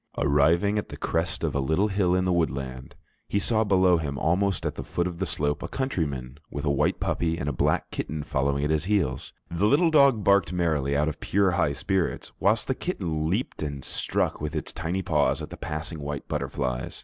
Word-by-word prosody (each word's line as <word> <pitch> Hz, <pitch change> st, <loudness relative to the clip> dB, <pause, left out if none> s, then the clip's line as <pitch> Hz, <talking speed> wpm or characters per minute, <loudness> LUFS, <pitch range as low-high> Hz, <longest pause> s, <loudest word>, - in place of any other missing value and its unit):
Arriving 80 Hz, +9 st, +3 dB
at -, -, -6 dB
the -, -, -8 dB
crest 80 Hz, -1 st, -1 dB
of -, -, 0 dB
a 70 Hz, -, 0 dB
little 80 Hz, +9 st, +2 dB
hill 95 Hz, -3 st, +2 dB
in 90 Hz, 0 st, +1 dB
the 90 Hz, -, +2 dB
woodland, 65 Hz, -6 st, -2 dB, 0.3 s
he -, -, -1 dB
saw 110 Hz, +2 st, +2 dB
below 95 Hz, -3 st, +4 dB
him, 70 Hz, -3 st, -3 dB
almost 95 Hz, +4 st, +1 dB
at -, -, -1 dB
the -, -, -6 dB
foot 85 Hz, -, -1 dB
of 90 Hz, -2 st, -4 dB
the 95 Hz, -, -1 dB
slope, 75 Hz, -2 st, -1 dB
a -, -, -4 dB
countryman 75 Hz, -, -3 dB
with 70 Hz, +1 st, -5 dB
a 75 Hz, -, +2 dB
white 70 Hz, -, +1 dB
puppy 85 Hz, -1 st, 0 dB
and 70 Hz, -, -4 dB
a -, -, +1 dB
black -, -, 0 dB
kitten 75 Hz, 0 st, -4 dB
following 70 Hz, +1 st, 0 dB
at 75 Hz, -, +1 dB
his 80 Hz, +1 st, +1 dB
heels. 95 Hz, -10 st, 0 dB, 0.2 s
The 85 Hz, +5 st, +2 dB
little 160 Hz, +7 st, +4 dB
dog 140 Hz, -8 st, +5 dB
barked 100 Hz, -2 st, +4 dB
merrily 80 Hz, -6 st, +1 dB
out 75 Hz, +1 st, +2 dB
of 80 Hz, 0 st, -3 dB
pure 100 Hz, -1 st, +2 dB
high 85 Hz, -5 st, +1 dB
spirits, 95 Hz, +5 st, -1 dB
whilst 105 Hz, +3 st, +2 dB
the 130 Hz, -, +1 dB
kitten 80 Hz, -, -2 dB
leaped 105 Hz, +9 st, -2 dB
and 70 Hz, -3 st, -4 dB
struck -, -, -1 dB
with 75 Hz, -1 st, -3 dB
its -, -, -3 dB
tiny 90 Hz, +4 st, -2 dB
paws 75 Hz, -4 st, +2 dB
at -, -, -7 dB
the -, -, -6 dB
passing 80 Hz, +1 st, -5 dB
white 75 Hz, -1 st, -5 dB
butterflies. 65 Hz, -4 st, -3 dB
80 Hz, 215 wpm, -26 LUFS, 70-95 Hz, 0.3 s, dog